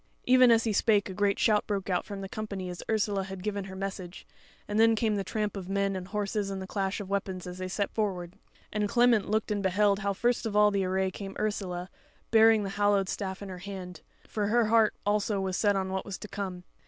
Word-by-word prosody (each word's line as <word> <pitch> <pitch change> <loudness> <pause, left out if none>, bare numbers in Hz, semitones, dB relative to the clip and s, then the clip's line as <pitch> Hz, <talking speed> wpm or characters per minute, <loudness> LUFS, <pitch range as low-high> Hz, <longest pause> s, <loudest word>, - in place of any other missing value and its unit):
Even 255 0 +6
as 230 -1 +5
he 220 - 0
spake 205 0 +3
a 190 - -6
great 200 +1 +1
shout 210 -2 +2
broke 200 -3 -2
out 180 -2 0
from 200 -2 -6
the 195 - -5
company 200 -3 -5
as 175 - -7
Ursula 205 -3 +1
had 190 -1 -8
given 200 -2 -2
her 190 -1 -8
message, 190 -2 -6 0.4
and 210 +1 -1
then 225 0 +6
came 220 -1 +1
the 200 - -1
tramp 210 0 -2
of 190 -2 -6
men 195 0 0
and 185 -1 -5
horses 205 0 -2
and 195 -1 -4
the 190 - -5
clash 195 +1 -2
of 205 - -6
weapons 190 -2 -2
as 180 0 -7
they 185 - -3
set 200 +2 -2
forward; 185 -5 -2 0.4
and 210 -1 0
Clement 235 -3 +3
looked 215 0 0
and 205 -1 0
beheld 200 +1 +2
how 200 -1 0
first 240 +3 0
of 210 - -4
all 210 0 +6
the 200 -1 +1
array 190 0 0
came 195 0 -7
Ursula, 185 -4 -2 0.4
bearing 225 -1 +6
the 195 - -4
hallowed 200 -2 +3
staff 190 0 -4
in 200 - -7
her 185 -1 -7
hand; 185 -2 -8 0.3
for 210 -2 -1
her 235 +2 +3
heart 220 0 +4
also 205 0 +1
was 190 -1 -2
set 205 0 +2
on 190 -1 -1
what 190 0 -2
was 200 -2 -6
to 210 - -9
come. 190 -3 -5
200 Hz, 240 wpm, -29 LUFS, 190-210 Hz, 0.4 s, Even